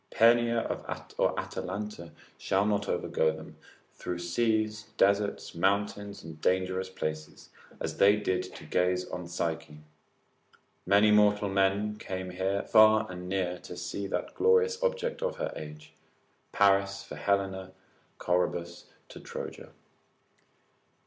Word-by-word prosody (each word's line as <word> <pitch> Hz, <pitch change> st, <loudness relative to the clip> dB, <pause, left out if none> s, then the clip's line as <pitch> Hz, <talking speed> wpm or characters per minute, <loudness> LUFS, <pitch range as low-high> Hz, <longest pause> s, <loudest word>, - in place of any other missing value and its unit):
Penia 115 Hz, 0 st, +4 dB, 0.5 s
or -, -, +2 dB
Atalanta 95 Hz, -3 st, -5 dB, 0.2 s
shall 100 Hz, +1 st, +1 dB
not 105 Hz, -1 st, 0 dB
overgo 80 Hz, 0 st, 0 dB
them, 80 Hz, -, -11 dB, 0.4 s
through 90 Hz, -, -5 dB
seas, 110 Hz, +4 st, 0 dB
deserts, 100 Hz, +1 st, +2 dB
mountains, 100 Hz, +2 st, -1 dB
and 80 Hz, -1 st, -10 dB
dangerous 95 Hz, 0 st, 0 dB
places, 75 Hz, -4 st, -6 dB, 0.3 s
as -, -, -4 dB
they 100 Hz, +1 st, +6 dB
did 100 Hz, -3 st, 0 dB
to -, -, -10 dB
gaze 90 Hz, 0 st, +1 dB
on 90 Hz, -1 st, -5 dB
Psyche: 80 Hz, -3 st, -3 dB, 1.1 s
many 105 Hz, +2 st, +5 dB
mortal 105 Hz, -1 st, +4 dB
men 100 Hz, +2 st, +1 dB
came 95 Hz, -1 st, -5 dB, 0.3 s
far 110 Hz, 0 st, +6 dB
and 90 Hz, 0 st, -7 dB
near 90 Hz, -2 st, -1 dB
to 90 Hz, -, -9 dB
see 90 Hz, +3 st, -4 dB
that -, -, -3 dB
glorious 465 Hz, +1 st, +3 dB
object 485 Hz, -1 st, -1 dB
of -, -, -1 dB
her -, -, -3 dB
age, 75 Hz, 0 st, -9 dB, 0.6 s
Paris 100 Hz, 0 st, +3 dB
for -, -, -9 dB
Helena, 95 Hz, -2 st, -1 dB, 0.5 s
Corebus 90 Hz, -1 st, -1 dB, 0.2 s
to -, -, -10 dB
Troja. -, -, -7 dB
100 Hz, 120 wpm, -29 LUFS, 90-105 Hz, 1.1 s, they